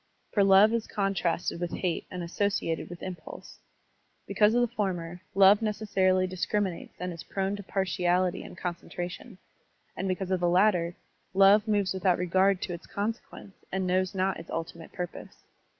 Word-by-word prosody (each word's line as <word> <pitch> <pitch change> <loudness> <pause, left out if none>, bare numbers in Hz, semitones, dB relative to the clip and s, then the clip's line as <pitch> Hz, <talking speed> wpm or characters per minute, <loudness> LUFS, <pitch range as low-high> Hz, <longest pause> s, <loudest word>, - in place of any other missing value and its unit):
For 205 - +3
love 195 +3 +6
is 230 -1 -1
contrasted 190 -4 -1
with 175 -1 -3
hate 175 -3 -2
and 180 -1 -5
associated 175 -2 -1
with 175 0 -9
impulse. 185 -2 -8 0.7
Because 215 +1 +3
of 245 - +4
the 240 0 -1
former, 175 -5 -3
love 195 +2 +7
necessarily 195 -4 +1
discriminates 185 0 -2
and 180 0 -3
is 165 - -8
prone 195 +2 -2
to - - -7
partiality 185 -1 0
and - - -11
con 180 -1 -2
centration; 175 +5 -7 0.6
and 195 - -3
because 185 0 -2
of 185 - +2
the 175 0 +2
latter, 180 -2 +3 0.4
love 200 +2 +6
moves 205 -3 +1
without 185 -1 +2
regard 185 +2 +2
to 180 - -3
its 170 - -9
consequence 205 -1 -5 0.2
and 190 0 -1
knows 185 +1 0
not 190 +1 0
its 165 - -11
ultimate 165 0 -6
purpose. 180 -1 -8
185 Hz, 165 wpm, -28 LUFS, 175-200 Hz, 0.7 s, love